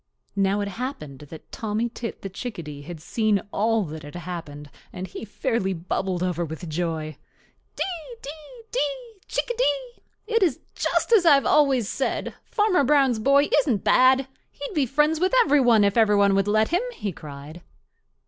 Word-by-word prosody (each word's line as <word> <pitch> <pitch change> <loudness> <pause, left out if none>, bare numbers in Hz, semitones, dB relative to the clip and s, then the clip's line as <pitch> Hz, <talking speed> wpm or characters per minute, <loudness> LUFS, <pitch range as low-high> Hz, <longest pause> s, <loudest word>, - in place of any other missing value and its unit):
Now 200 +1 +1
it 200 - -2
happened 200 - -6
that 160 - -12
Tommy 220 +1 -2
Tit 230 -1 -7
the - - -3
Chickadee 170 - -7
had 160 +3 -8
seen 215 +4 +1
all 225 +1 +1
that 160 -2 -7
had 145 +2 -11
happened, 155 -5 -7 0.2
and 185 - -6
he 190 - -8
fairly 220 -2 -1
bubbled 180 +1 -2
over 175 -2 -1
with 160 +2 -6
joy. 155 -2 -3 0.6
"Dee, 365 +5 -4
dee, 310 - -10
dee, - - -3
Chickadee! - - -1 0.2
It 455 +1 +1
is 330 -9 +2
just - - 0
as 420 -6 +6
I 295 - +9
have 275 - +1
always 275 -7 +3
said—Farmer 365 - 0
Brown's 270 -4 +3
boy 280 +5 +4
isn't 250 -8 0
bad. 260 +1 +4 0.2
He'd 285 +7 -8
be 290 -6 +1
friends 300 +5 +2
with 370 +7 +2
every 290 0 +4
one 235 -4 +5
if 200 0 +2
every 220 -3 +4
one 200 -1 +4
would 195 0 +2
let 215 +1 +2
him," 350 +4 +2
he 205 - -3
cried. 150 +1 -10
220 Hz, 165 wpm, -24 LUFS, 180-290 Hz, 0.6 s, I